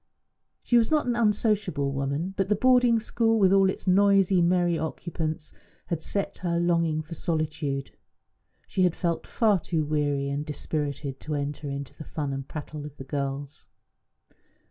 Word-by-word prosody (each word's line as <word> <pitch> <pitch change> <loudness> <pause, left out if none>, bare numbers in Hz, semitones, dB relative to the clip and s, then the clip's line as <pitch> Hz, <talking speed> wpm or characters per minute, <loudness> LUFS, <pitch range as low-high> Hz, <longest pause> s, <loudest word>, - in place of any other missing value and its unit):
She 240 - +3
was 225 - +1
not 305 -1 +2
an 245 -1 0
unsociable 210 -9 +1
woman; 140 +7 -2
but 195 -1 0
the 210 - +2
boarding 245 0 +4
school, 225 0 +1
with 195 -3 +4
all 195 -1 +5
its - - -4
noisy, 195 -1 +4
merry 175 0 +3
occupants, 160 -1 -4 0.4
had 165 -2 -1
set 200 +4 -2
her 170 -2 0
longing 170 -2 +1
for 160 - -9
solitude. 155 -5 -2 0.7
She 190 - -2
had 180 -2 +3
felt 170 -2 -2
far 215 -5 +2
too 160 -2 -1
weary 145 -2 0
and 140 +1 -2
dispirited 145 -2 -3
to 155 0 -4
enter 145 0 -3
into 140 -1 -5
the - - -9
fun 150 -3 -4
and 135 0 -5
prattle 150 -1 -7
of 150 -1 -9
the - - -7
girls. 140 +1 -4
165 Hz, 165 wpm, -27 LUFS, 145-195 Hz, 0.7 s, all